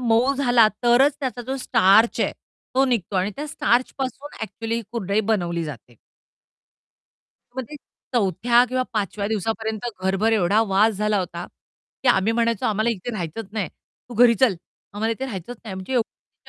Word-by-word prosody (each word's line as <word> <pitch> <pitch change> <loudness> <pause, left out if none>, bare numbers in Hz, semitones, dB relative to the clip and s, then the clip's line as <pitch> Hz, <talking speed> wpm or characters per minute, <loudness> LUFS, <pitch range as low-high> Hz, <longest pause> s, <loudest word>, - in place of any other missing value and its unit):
मऊ 245 +3 +3
झाला 245 -4 +4 0.2
तरच 260 +4 +5
त्याचा 250 -2 -3
जो 265 +3 -3
स्टार्च 225 -3 +4
आहे - - +1 0.4
तो 270 +1 +4
निघतो 220 -7 -1
आणि 185 +2 +1
त्या 295 +2 -4
स्टार्चपासून 260 +1 -1
एक्चुअली 225 +2 -4
ही 230 - -2
कुरडई 200 -2 0
बनवली 170 -5 0
जाते. 125 -5 -10 1.6
मग 260 - -2
ते 300 - -7 0.4
चौथ्या 235 +3 +3
किंवा 255 0 0
पाचव्या 200 -1 -2
दिवसापर्यंत 220 +1 -2
घरभर 195 +4 +1
एवढा 205 +1 +3
वास 210 +3 +3
झाला 210 +1 +1
होता 175 -2 -4 0.6
की 265 - +2
आम्ही 220 -1 +3
म्हणायचो, 230 -2 0
"आम्हाला 220 +2 +1
इथे 225 +2 -4
राहायचंच 185 +2 -5
नाही, 210 -6 -2
तू 245 - -17
घरी 235 +1 +6
चल, 225 -3 +3 0.4
आम्हाला 220 +2 -1
इथे 260 +4 -5
राहायचंच 245 -1 -6
नाही." 205 -4 -6
म्हणजे 190 +6 -6
एवढी 240 -3 -4
225 Hz, 160 wpm, -23 LUFS, 195-245 Hz, 1.6 s, घरी